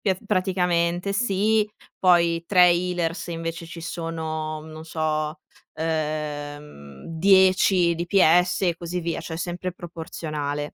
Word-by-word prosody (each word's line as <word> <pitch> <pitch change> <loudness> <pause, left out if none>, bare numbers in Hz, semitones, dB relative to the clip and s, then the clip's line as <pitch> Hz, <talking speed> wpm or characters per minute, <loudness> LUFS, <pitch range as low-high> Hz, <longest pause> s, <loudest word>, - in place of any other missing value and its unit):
Pies 190 -3 +2
praticamente 180 -2 0
sì, 210 0 +1 0.3
poi 170 -2 +3
tra 180 -3 +6
healers 175 -1 0
invece 165 0 -5
ci 165 0 -9
sono, 160 -2 -4
non 155 0 -10
so, 155 -1 -2 0.3
ehm 150 - -4 0.3
10 185 0 +4
DPS 175 +1 +3
e 175 -2 +2
così 175 +1 -4
via, 170 -1 -3
cioè 160 - -6
sempre 180 +1 -4
proporzionale. 155 -4 -5
170 Hz, 110 wpm, -24 LUFS, 160-180 Hz, 0.3 s, tra